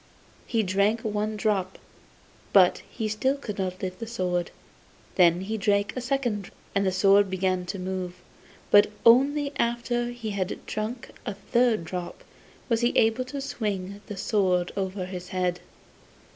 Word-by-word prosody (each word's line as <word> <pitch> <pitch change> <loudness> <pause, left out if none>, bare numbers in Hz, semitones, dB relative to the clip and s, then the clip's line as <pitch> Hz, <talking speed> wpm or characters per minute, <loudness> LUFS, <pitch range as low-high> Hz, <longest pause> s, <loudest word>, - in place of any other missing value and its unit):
He 225 -2 +1
drank 200 +4 +2
one 215 0 -2
drop, 200 -3 0 0.8
but - - +6 0.3
still 215 +6 +1
he - - -12
could 210 -7 -6
not 185 -1 -3
lift 185 -1 -4
the 230 - -5
sword; 180 -6 -1 0.6
then 175 -1 +4
he 215 +3 -3
drank 200 -1 +1
a 255 - -3
second, 240 -6 -1 0.2
and 200 -1 +2
the - - +2
sword 195 +2 +4
began 185 -1 0
to 195 - -4
move; 185 -1 -4 0.6
but 205 0 +7 0.2
only 280 +5 +5
after 240 0 0
he 240 -3 -5
had 195 -1 -3
drunk 220 +3 -4
a 205 - -4
third 235 0 +1
drop 180 +1 -6 0.4
was 230 -2 +1
he 240 - +2
able 225 +3 +3
to 275 +2 -5
swing 205 -7 -3
the 205 - -6
sword 185 -3 +1
over 190 -1 -2
his 180 -1 -7
head. 180 -1 -1
205 Hz, 155 wpm, -26 LUFS, 185-230 Hz, 0.8 s, but